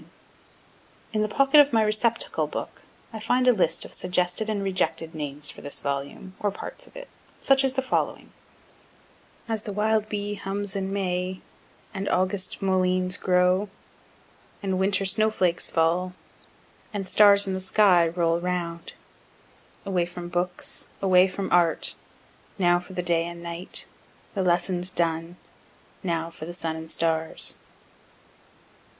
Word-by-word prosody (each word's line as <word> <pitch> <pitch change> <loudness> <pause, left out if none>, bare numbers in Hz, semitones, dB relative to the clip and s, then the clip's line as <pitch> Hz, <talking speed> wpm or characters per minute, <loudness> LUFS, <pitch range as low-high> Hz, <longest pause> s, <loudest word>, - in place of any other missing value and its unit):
Note: - - -19 1.0
In 215 - +1
the 215 - +1
pocket 275 +5 +5
of 290 -1 +6
my 225 -2 +4
receptacle 215 +2 +1
book - - -6 0.3
I 220 - -5
find 245 +3 +1
a 250 - +7
list 195 - +1
of - - -10
suggested 180 +4 0
and 205 -2 -1
rejected 185 -4 -1
names 150 -1 -4
for - - -12
this 145 - -3
volume, 140 +7 -4
or 205 - +1
parts - - -8
of - - -20
it - - -8 0.3
such 270 0 +4
as 265 -1 +2
the 265 0 -1
following: 260 - -1 1.2
As 220 -2 -2
the 210 - -6
wild 215 +1 +1
bee 205 0 -2
hums 200 0 -4
in 195 0 -2
May, 185 -1 -2 0.3
& - - -31 0.2
August 185 +1 -1
mulleins 185 -1 +2
grow, 185 +2 +2 0.4
& - - -31
Winter 190 0 +1
snow 215 +3 +3
flakes 180 -5 0
fall, 170 +3 +1 0.8
& 205 -1 -2
stars 200 +1 +6
in 190 - -1
the 190 - -2
sky 185 -2 +4
roll 170 0 +1
round. 170 -1 -3 0.9
_Away 180 -3 0
from 175 0 -7
Books 180 +1 -3
away 185 -1 +5
from 190 +1 -4
Art, 175 -2 +2 0.6
Now 175 -2 +4
for 180 +2 -12
the 180 - -2
Day 170 -1 +1
and 170 0 -8
Night 170 +2 -5 0.5
the 195 - -1
lessons 180 0 +1
done, 165 -1 -1 0.7
Now 170 -3 -2
for 155 -1 -9
the 175 - -6
Sun 165 -2 -3
and 160 0 -8
Stars. 160 -1 -1
185 Hz, 150 wpm, -26 LUFS, 175-205 Hz, 1.2 s, a